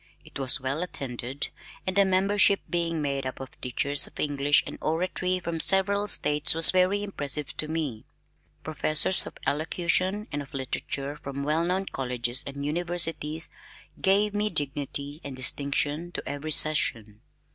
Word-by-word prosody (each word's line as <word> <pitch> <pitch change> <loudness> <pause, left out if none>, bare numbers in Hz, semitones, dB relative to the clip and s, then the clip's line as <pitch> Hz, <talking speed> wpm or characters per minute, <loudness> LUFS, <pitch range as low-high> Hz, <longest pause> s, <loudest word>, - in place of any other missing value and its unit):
It - - -9
was 130 -2 +5
well 135 +4 -2
attended, 135 -5 -2 0.4
and 185 - -2
the 200 0 +5
membership 195 +1 +3
being 165 -2 -2
made 140 -1 -2
up 130 0 -6
of 135 -1 -10
teachers 140 +3 0
of - - -14
English 145 0 +2
and - - -8
Oratory 180 +3 -1
from 170 -2 -4
several 200 +3 +5
states 150 -5 +4
was 165 0 +10
very 185 +2 +2
impressive 150 -7 -4
to 155 - -3
me. 150 -8 -4 0.6
Professors 155 +3 +3
of - - -10
elocution 180 +7 -1
and 145 0 -3
of 140 -1 -11
literature 135 +1 -4
from 140 -1 -6
well 155 +3 0
known 185 +3 -1
colleges 125 -4 -3
and 140 +1 -6
universities 165 -1 -2 0.5
gave 200 +2 +2 0.2
dignity 145 +1 -2
and 140 -2 -7
distinction 145 +5 -1
to - - -6
every 145 +2 -5
session. 110 -9 0
150 Hz, 145 wpm, -26 LUFS, 140-175 Hz, 0.6 s, was